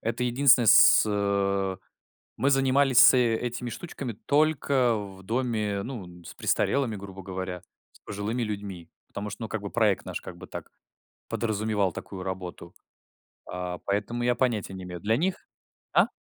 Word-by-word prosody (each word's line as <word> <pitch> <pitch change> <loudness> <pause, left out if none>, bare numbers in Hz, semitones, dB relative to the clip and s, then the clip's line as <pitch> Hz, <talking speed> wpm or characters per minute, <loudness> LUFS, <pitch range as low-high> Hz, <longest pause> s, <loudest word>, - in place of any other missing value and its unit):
это 115 +2 -2
единственное 125 -1 +4
с - - +8
э 100 -2 0 0.6
мы 140 - +2
занимались 135 -1 +3
с - - +9
этими 120 0 0
штучками 135 -2 -6
только 140 -5 +2
в 100 -2 -7
доме, 110 -2 -1
ну, 120 -8 -6
н 90 0 -14
с - - -9
престарелыми, 130 -6 0
грубо 95 -1 -9
говоря, 95 -1 -5 0.3
с - - -22
пожилыми 105 +5 -4
людьми. 100 -6 -5 0.2
Потому 105 +1 -5
что 105 +3 -7
ну 110 - -5
как 110 - -3
бы 100 - -5
проект 110 -4 +1
наш - - -5
как - - -10
бы - - -11
так - - -8 0.6
подразумевал 105 -3 0
такую 95 -2 -7
работу. 90 -2 -6 0.8
А, 90 0 -4
поэтому 105 +4 -2
я 120 0 +2
понятия 115 -6 -1
не 95 -1 -7
имею 90 -1 -7
для 110 +4 +1
них 180 +4 -2 0.5
А? - - +5
105 Hz, 160 wpm, -27 LUFS, 95-125 Hz, 0.8 s, с